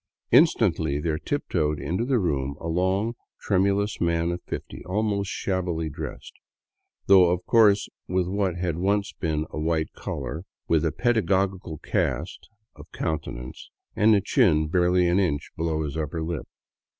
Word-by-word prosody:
Instantly 85 - +4
there 80 0 -1
tiptoed 75 0 -1
into 90 +7 -2
the 130 -1 +2
room 70 - -1
a 85 - -6
long, 95 +6 0 0.3
tremulous 100 +1 +1
man 85 0 +1
of 85 0 -4
fifty, - - -6
almost 100 +1 -1
shabbily 85 -6 -2
dressed, - - -7 0.7
though 95 -3 +7
of 90 0 -1
course 105 -3 +4 0.2
with 90 0 0
what 95 -2 0
had 90 -3 -2
once 100 +2 0
been 80 -2 -2
a - - -4
white 80 0 -1
collar, 80 - -5 0.2
with 80 -1 +2
a 80 - +1
pedagogical 95 -7 0
cast - - -2 0.3
of - - -14
countenance 65 -5 -5 0.3
and 110 +1 +5
a 100 - +3
chin 90 - +3
barely 90 +2 +3
an 90 +3 +3
inch 80 -7 -1
below 80 -1 -1
his 75 -1 -4
upper 80 +1 -3
lip. 80 -2 -4
90 Hz, 150 wpm, -25 LUFS, 80-100 Hz, 0.7 s, though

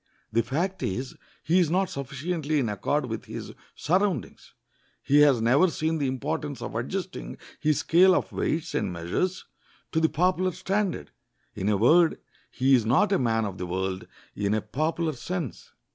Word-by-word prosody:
The 115 - +4
fact 170 - -2
is, 125 +7 -3 0.3
he 175 +4 +3
is 175 -4 +3
not 185 +3 +2
sufficiently 150 +3 -3
in 125 -6 +1
accord 135 +8 -1
with 115 -2 -5
his - - -7 0.2
surroundings. 185 +4 -1 0.5
He 145 +1 +4
has 140 -6 +5
never 140 +10 +4
seen 160 0 -1
the 140 - 0
importance 145 +1 -3
of - - -6
adjusting 180 - -4 0.2
his 155 -2 +1
scale 185 +2 +5
of - - -1
weights 160 0 -2
and - - -1
measures 90 - -2 0.5
to 160 - +1
the 160 0 +3
popular 180 +3 +1
standard. 190 - -2 0.4
In 100 - -2
a 105 - +2
word, 160 - +5 0.3
he 135 +1 +2
is 125 -3 +5
not 185 - +3
a 195 - +3
man 115 -3 +1
of 95 -2 -6
the 90 - -3
world, 95 +1 -3 0.3
in 100 +1 0
a 110 - 0
popular 155 +8 -1
sense. 165 - -5
150 Hz, 170 wpm, -26 LUFS, 115-175 Hz, 0.5 s, has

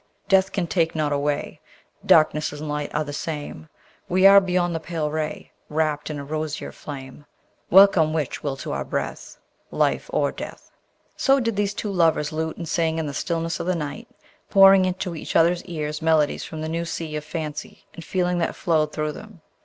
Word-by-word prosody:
Death 190 -1 +4
can 190 -3 -1
take 165 -1 0
not 150 -2 0
away, 145 0 -2 0.4
Darkness 155 -1 +4
and 150 +1 -7
light 150 0 -3
are 150 - 0
the 145 -1 -7
same: 155 0 -5 0.4
We 185 +2 +3
are 200 0 +9
beyond 180 -2 0
the 165 - -2
pale 160 -2 -3
ray, 155 0 -4 0.2
Wrapt 155 -1 -1
in 150 - -4
a 140 - -5
rosier 155 0 -4
flame: 140 0 -10 0.4
Welcome 185 -4 +6
which 155 -4 -2
will 140 -2 -3
to - - -6
our - - -2
breath; - - -5 0.3
Life - - 0
or - - +1
death! - - -9 0.4
So 275 0 +3
did 230 -4 -1
these 205 0 -1
two 210 - -3
lovers 165 -5 +2
lute 160 0 -3
and 170 - -6
sing 160 0 0
in 160 - -1
the 145 - -4
stillness 165 +2 -2
of - - -4
the 185 - +1
night, 150 -3 -5 0.4
pouring 195 -1 +7
into 185 -1 -3
each 155 - -6
other's 170 +1 +3
ears 150 -4 -4
melodies 160 -2 +2
from 155 -1 -7
the 155 - -3
new 165 +1 -2
sea 165 -2 -5
of 150 - -3
fancy 155 -2 -6
and 165 - -9
feeling 180 -1 0
that 165 - -1
flowed 155 -3 +1
through 155 -1 -2
them. 210 +2 -12
160 Hz, 190 wpm, -23 LUFS, 150-180 Hz, 0.4 s, are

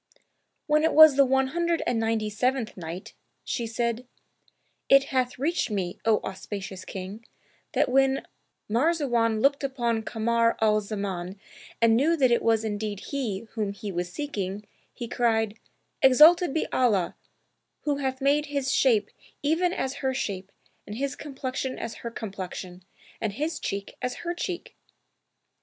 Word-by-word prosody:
When 300 0 +3
it 320 - +3
was 315 -2 +9
the 275 0 +6
One 265 0 +2
Hundred 340 +2 0
and 235 - +1
Ninety 225 -1 0
seventh 250 +1 0
Night, 170 +1 -7 0.3
She 235 -3 -2
said, 235 +2 -2 0.8
It 275 0 +7
hath 255 -1 0
reached 315 +5 0
me, 190 -4 -3
O 220 -1 +4
auspicious 190 0 -6
King, 195 +4 -7 0.5
that - - +2
when 270 +1 +2 0.4
Marzawan 240 -4 +1
looked 280 +2 +3
upon 240 -4 0
Kamar 230 +1 +1
al 215 -1 +3
Zaman 200 -3 -4 0.4
and 230 -1 +5
knew 315 +8 +3
that 260 -4 +4
it 235 - +3
was 225 -1 +2
indeed 210 -2 -3
he 235 -9 -2
whom 210 -3 -2
he 205 0 -6
was 175 0 -3
seeking, 205 -7 -4 0.3
he 240 - -6
cried, 225 -3 0 0.4
"Exalted 305 +6 +7
be 320 - 0
Allah, 210 -9 +2 0.7
Who 290 -2 0
hath 265 -1 -2
made 290 +2 +2
his 280 -2 -1
shape 220 -6 +3 0.3
even 330 +4 +2
as 270 -5 -3
her 265 -1 0
shape 195 -7 -4 0.4
and 210 - -6
his 275 +1 -2
complexion 265 -2 -4
as 230 -1 -5
her 235 - -4
complexion 190 -4 -7 0.4
and 220 -3 -1
his 305 +9 -2
cheek 200 0 -4
as 250 0 -2
her 345 - -1
cheek!'' 350 0 -5
235 Hz, 150 wpm, -26 LUFS, 210-275 Hz, 0.8 s, was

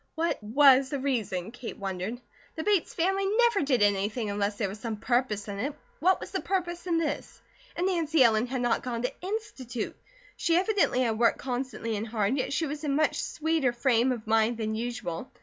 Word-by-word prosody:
What 330 -5 -1
was 265 +4 +5
the 285 - -2
reason, 220 -8 -2
Kate 245 -1 -7
wondered. 195 +4 -4 0.4
The 320 - -3
Bates 405 -3 +2
family 385 +3 +1
never 465 0 +3
did 265 -7 +2
anything 205 +2 +1
unless 205 0 -1
there 205 - 0
was 200 +2 -7
some 225 -1 -3
purpose 240 -3 0
in 200 -1 -5
it, 280 +6 -2 0.2
what 375 +1 +3
was - - -8
the - - -2
purpose 350 -2 -2
in 340 -2 +2
this? 320 -3 -3 0.4
And 350 - 0
Nancy 325 -6 +3
Ellen 225 0 +3
had 255 0 -2
not 240 -1 +1
gone 235 -2 -3
to 250 - -1
Institute. 315 - -4 0.4
She 335 0 +2
evidently 380 - +2
had 225 -3 0
worked 235 - +4
constantly 250 -3 -3
and 210 +2 -3
hard, 215 +1 0
yet 260 - -1
she 320 +3 0
was 295 +1 -5
in 285 -2 0
much 310 +1 +2
sweeter 315 -5 0
frame 240 0 +2
of 235 -3 -4
mind 225 +1 +2
than 220 -1 -2
usual. 230 -4 -4
250 Hz, 200 wpm, -28 LUFS, 220-320 Hz, 0.4 s, was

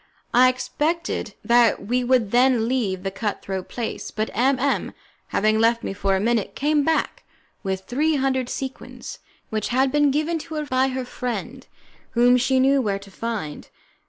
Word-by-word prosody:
I 255 +1 +7
expected 305 +6 -2
that 235 -4 +4
we 250 +4 0
would 245 -5 +2
then 245 -2 +3
leave 210 -8 -1
that 195 -1 -3
cutthroat 195 -3 -4
place, 235 -2 -4
but 215 0 -3
M 260 +3 +3
M, 275 +2 0 0.3
having 215 +1 +2
left 230 +1 +3
me - - -3
for 195 -1 0
a - - +1
minute, 225 0 0
came 295 +1 +2
back 320 +2 0 0.4
with 190 -1 -2
three 290 +10 0
hundred 260 -2 0
sequins 265 -1 -6 0.3
which 215 -1 -1
had 260 +2 +2
been 295 0 +3
given 310 +4 0
to 320 +1 -8
her 305 0 -2
by 260 -1 +2
her 260 -1 -3
friend, 245 +1 -5 0.5
whom 245 +1 +6
she 260 +1 +2
knew 270 +1 +4
where 205 -4 -1
to 195 0 -13
find. 215 -9 -5
245 Hz, 170 wpm, -23 LUFS, 215-270 Hz, 0.5 s, I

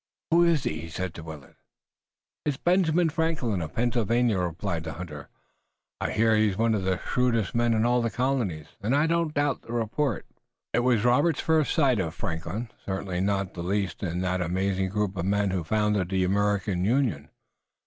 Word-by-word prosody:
"Who 170 +1 +6
is 165 -5 +3
he?" 75 - -2
he 80 - -7
said 90 +2 -4
to - - -9
Willet. 80 -4 -10 0.9
"It's 145 -3 -1
Benjamin 175 -1 +2
Franklin, 150 - -1
of 80 -1 -6
Pennsylvania," 120 -2 +1
replied 85 -1 -2
the 80 -1 -5
hunter. 75 -3 -8 0.7
"I - - -1
hear 110 0 +3
he's 105 -3 +2
one 115 0 +2
of 100 -3 -1
the 95 -1 +1
shrewdest 115 -2 0
men 120 -1 +2
in 110 +1 +2
all 120 0 +3
the 115 - 0
colonies, 115 - -1
and 115 +7 +1
I 145 +2 +3
don't 165 -1 +1
doubt 145 -2 +1
the 115 - -9
report." 120 +2 -1 0.5
It - - +3
was 120 -3 +2
Robert's 145 +7 +3
first 160 -3 +2
sight 135 -8 +3
of 85 -2 -2
Franklin, 95 +7 -4
certainly 95 -2 -3
not 100 0 0
the 85 - -6
least 95 0 -2
in 90 -2 -2
that 90 0 0
amazing 95 +2 0
group 100 0 -1
of 85 - -2
men 100 0 +1
who 90 -2 -1
founded 105 0 +1
the 95 -1 +1
American 100 -1 +1
Union. 105 - +1
105 Hz, 185 wpm, -27 LUFS, 90-125 Hz, 0.9 s, Who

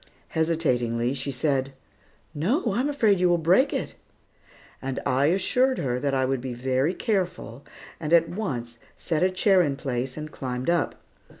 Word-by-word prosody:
Hesitatingly, 125 -7 0
she 140 +1 -4
said, 135 0 -1 0.6
"No, 215 - 0
I 230 - 0
am 275 +3 +1
afraid 220 -9 +3
you 180 0 +3
will 175 - +4
break 185 - +3
it." - - -3 0.9
I 135 +1 0
assured 250 +9 +2
her 125 -2 -1
that 140 0 0
I 130 0 +2
would 130 -1 -1
be 125 -1 -5
very 130 +7 0
careful, 180 - -2 0.4
and 155 -1 -4
at 165 -1 +5
once 120 - -4 0.2
set 160 -3 -2
a 185 - +4
chair 185 0 +3
in 145 -5 0
place 130 -1 -3
and 155 0 -6
climbed 130 +3 -2
up. 170 -4 0
150 Hz, 165 wpm, -25 LUFS, 130-185 Hz, 0.9 s, at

